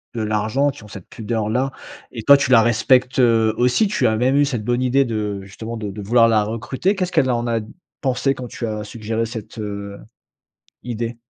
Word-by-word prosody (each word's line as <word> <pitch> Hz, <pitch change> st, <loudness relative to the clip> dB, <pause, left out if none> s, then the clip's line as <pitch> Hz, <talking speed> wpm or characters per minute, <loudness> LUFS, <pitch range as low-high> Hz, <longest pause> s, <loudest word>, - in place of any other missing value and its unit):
de 115 Hz, -, -2 dB
l'argent, 110 Hz, +6 st, 0 dB
qui 130 Hz, -, -9 dB
ont -, -, -12 dB
cette 95 Hz, -3 st, -11 dB
pudeur-là 115 Hz, +4 st, -2 dB, 0.4 s
et 115 Hz, -, -6 dB
toi, 140 Hz, +3 st, +8 dB
tu 140 Hz, -, -1 dB
la 115 Hz, -2 st, +7 dB
respectes, 125 Hz, +3 st, +2 dB
heu, 115 Hz, -3 st, +4 dB
aussi. 125 Hz, -, +3 dB
Tu 200 Hz, -, +1 dB
as 110 Hz, -, +1 dB
même 125 Hz, +4 st, +1 dB
eu 145 Hz, -, +4 dB
cette 120 Hz, -6 st, -3 dB
bonne 120 Hz, +3 st, 0 dB
idée 130 Hz, +2 st, +2 dB
de, 105 Hz, -3 st, -3 dB
justement, 110 Hz, +4 st, -8 dB
de 105 Hz, -2 st, -5 dB
de 105 Hz, +1 st, -8 dB
vouloir 115 Hz, +3 st, +4 dB
la 110 Hz, -2 st, +3 dB
recruter. 125 Hz, -, -2 dB
Qu'est-ce 185 Hz, -1 st, -2 dB
qu'elle 130 Hz, -, +2 dB
en 120 Hz, -1 st, 0 dB
a 115 Hz, -1 st, 0 dB, 0.4 s
pensé 135 Hz, 0 st, +1 dB
quand 125 Hz, -1 st, -7 dB
tu 120 Hz, -, -6 dB
as 105 Hz, -1 st, -4 dB
suggéré 110 Hz, +1 st, -3 dB
cette, 110 Hz, -1 st, -8 dB
heu, 100 Hz, -1 st, -6 dB, 0.8 s
idée? 120 Hz, -1 st, -4 dB
115 Hz, 205 wpm, -20 LUFS, 110-130 Hz, 0.8 s, toi